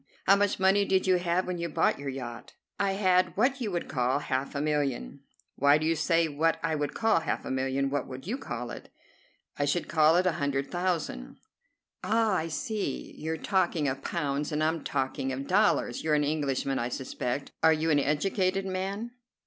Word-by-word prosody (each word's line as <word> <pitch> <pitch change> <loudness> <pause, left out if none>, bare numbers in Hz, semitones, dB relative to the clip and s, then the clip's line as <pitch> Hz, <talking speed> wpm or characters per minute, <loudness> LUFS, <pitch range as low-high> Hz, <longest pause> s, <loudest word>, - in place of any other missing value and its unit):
"How 195 - +7
much 205 0 +1
money 190 +2 +4
did 190 -1 +1
you 185 -1 +4
have 175 +1 0
when 180 -1 -3
you 170 0 -2
bought 150 - +1
your 140 -1 -4
yacht?" 120 -3 -7 0.3
"I 200 -1 +1
had 185 -2 +2
what 260 +5 +2
you 225 - -1
would 175 -3 -3
call 125 0 +1
half 135 -1 -2
a - - -1
million." 145 - -1 0.4
"Why 140 +2 +5
do 155 - -2
you 165 +1 +2
say 165 +1 +2
what 160 +2 +1
I 165 -1 0
would 145 -2 -2
call 225 -5 +3
half 160 - -3
a - - -4
million? 135 +1 0
What 145 - -1
would 130 +1 -8
you 240 +9 -3
call 120 - -5
it?" - - -9 0.7
"I 145 - +2
should 155 +5 0
call 155 0 +4
it 180 +1 +3
a 185 - +4
hundred 140 -1 -1
thousand." 170 - -2 0.7
"Ah, 220 +2 +2
I 165 -3 0
see. 155 - -3
You're 160 +1 -3
talking 175 -4 +1
of 135 0 -2
pounds, 145 -2 -2
and 150 0 0
I'm 160 0 0
talking 135 -1 -2
of 135 +1 -4
dollars. 205 +5 +2
You're 155 -1 +2
an 150 - +2
Englishman, 140 -2 -1
I 120 - -1
suspect. 125 +1 -4
Are 160 - +6
you 160 +1 +1
an 145 - +4
educated 185 +6 0
man?" 195 +5 -3
155 Hz, 200 wpm, -28 LUFS, 140-185 Hz, 0.7 s, How